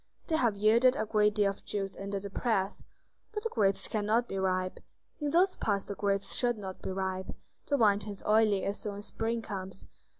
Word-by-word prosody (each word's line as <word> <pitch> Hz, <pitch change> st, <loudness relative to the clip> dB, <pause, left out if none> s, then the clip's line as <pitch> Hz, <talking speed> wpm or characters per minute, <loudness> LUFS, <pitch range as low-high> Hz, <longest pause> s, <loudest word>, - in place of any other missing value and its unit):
They 320 Hz, -, +1 dB
have 230 Hz, -8 st, +2 dB
yielded 230 Hz, +5 st, +5 dB
a 275 Hz, -, -1 dB
great 210 Hz, -1 st, +2 dB
deal 205 Hz, -2 st, +3 dB
of 195 Hz, -, -12 dB
juice 195 Hz, -2 st, -3 dB
under 200 Hz, 0 st, -4 dB
the 200 Hz, 0 st, -7 dB
press." 200 Hz, -3 st, 0 dB, 0.5 s
"But 420 Hz, -1 st, -3 dB
the 455 Hz, -, -1 dB
grapes 200 Hz, -, +2 dB
cannot 220 Hz, +2 st, +1 dB
be 195 Hz, -, -3 dB
ripe?" 185 Hz, -1 st, 0 dB, 0.4 s
"In 295 Hz, -1 st, -1 dB
those 360 Hz, +5 st, +4 dB
parts 200 Hz, -2 st, 0 dB
the -, -, -4 dB
grapes 200 Hz, 0 st, 0 dB
should 240 Hz, -2 st, +2 dB
not 190 Hz, -3 st, -7 dB
be -, -, -4 dB
ripe; 190 Hz, 0 st, -3 dB, 0.4 s
the 285 Hz, -, +2 dB
wine 205 Hz, -4 st, +4 dB
turns 205 Hz, -1 st, -7 dB
oily 215 Hz, -2 st, +4 dB
as 200 Hz, +1 st, -2 dB
soon 205 Hz, -2 st, -4 dB
as 205 Hz, -, -5 dB
spring 230 Hz, +1 st, -2 dB
comes." 190 Hz, -2 st, -6 dB
205 Hz, 205 wpm, -31 LUFS, 195-230 Hz, 0.5 s, yielded